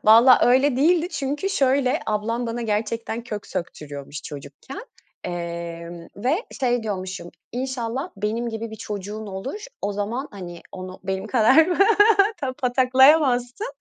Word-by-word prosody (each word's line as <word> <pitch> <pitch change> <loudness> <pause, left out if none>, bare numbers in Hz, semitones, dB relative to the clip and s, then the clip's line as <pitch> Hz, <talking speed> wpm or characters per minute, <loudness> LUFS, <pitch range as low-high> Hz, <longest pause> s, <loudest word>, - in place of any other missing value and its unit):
Valla 230 +4 +8
öyle 260 +2 +4
değildi 335 +4 +3
çünkü 285 +4 -2
şöyle: 275 -3 +2
Ablam 230 +3 -1
bana 235 +1 -3
gerçekten 225 +2 -2
kök 210 -3 -6
söktürüyormuş 145 -3 -6
çocukken. 145 - -9 0.5
Emm, 170 -1 -6
ve 270 - 0 0.2
şey 245 -2 +1
diyormuşum, 185 -4 -5 0.2
"İnşallah 255 +3 -3
benim 220 +4 -2
gibi 225 0 -5
bir 220 - -8
çocuğun 210 +1 -6
olur. 195 - -5 0.2
O 205 - -1
zaman, 225 +7 -3
hani, 175 -4 -9
onu 185 0 -8
benim 190 +1 -3
kadar 260 +7 +5 0.7
ta 265 -2 -3
pataklayamazsın. 260 - +3
230 Hz, 125 wpm, -23 LUFS, 190-260 Hz, 0.7 s, Valla